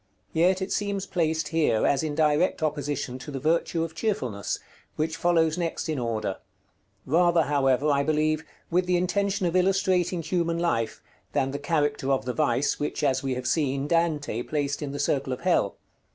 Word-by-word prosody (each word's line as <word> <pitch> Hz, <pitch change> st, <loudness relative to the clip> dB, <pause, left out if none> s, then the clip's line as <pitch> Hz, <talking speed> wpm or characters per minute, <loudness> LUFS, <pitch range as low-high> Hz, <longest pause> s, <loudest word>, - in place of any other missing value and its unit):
Yet 185 Hz, +3 st, +3 dB
it 190 Hz, -, -5 dB
seems 200 Hz, -2 st, -1 dB
placed 160 Hz, -5 st, 0 dB
here 155 Hz, -9 st, +2 dB
as 140 Hz, -, +2 dB
in 155 Hz, -2 st, -2 dB
direct 155 Hz, +2 st, +2 dB
opposition 145 Hz, -4 st, -2 dB
to 140 Hz, -, -9 dB
the 140 Hz, -2 st, -4 dB
virtue 165 Hz, +2 st, +1 dB
of 165 Hz, -1 st, -5 dB
Cheerfulness, 130 Hz, -, -2 dB, 0.4 s
which 160 Hz, +1 st, -1 dB
follows 165 Hz, -1 st, +2 dB
next 170 Hz, -2 st, -2 dB
in 155 Hz, -3 st, -1 dB
order; 110 Hz, -5 st, -2 dB, 0.7 s
rather, 170 Hz, +3 st, +4 dB
however, 140 Hz, -2 st, +2 dB
I 140 Hz, 0 st, +3 dB
believe, 155 Hz, +1 st, +1 dB, 0.3 s
with 180 Hz, +1 st, +2 dB
the 180 Hz, -1 st, +3 dB
intention 195 Hz, +2 st, 0 dB
of 170 Hz, 0 st, 0 dB
illustrating 185 Hz, -2 st, +2 dB
human 170 Hz, 0 st, 0 dB
life, 115 Hz, -10 st, -1 dB, 0.3 s
than 135 Hz, 0 st, +1 dB
the 140 Hz, -, -4 dB
character 145 Hz, -2 st, 0 dB
of 135 Hz, -, +1 dB
the 125 Hz, -, -2 dB
vice 145 Hz, -1 st, +1 dB
which, 150 Hz, +1 st, -3 dB
as 135 Hz, -2 st, +2 dB
we 135 Hz, -2 st, -2 dB
have 125 Hz, 0 st, -5 dB
seen, 140 Hz, -1 st, 0 dB
Dante 150 Hz, -7 st, 0 dB
placed 145 Hz, +2 st, -2 dB
in 145 Hz, -2 st, -3 dB
the 145 Hz, -, -5 dB
circle 140 Hz, -2 st, 0 dB
of 125 Hz, -, -6 dB
hell. 170 Hz, -, +2 dB
155 Hz, 180 wpm, -26 LUFS, 140-170 Hz, 0.7 s, rather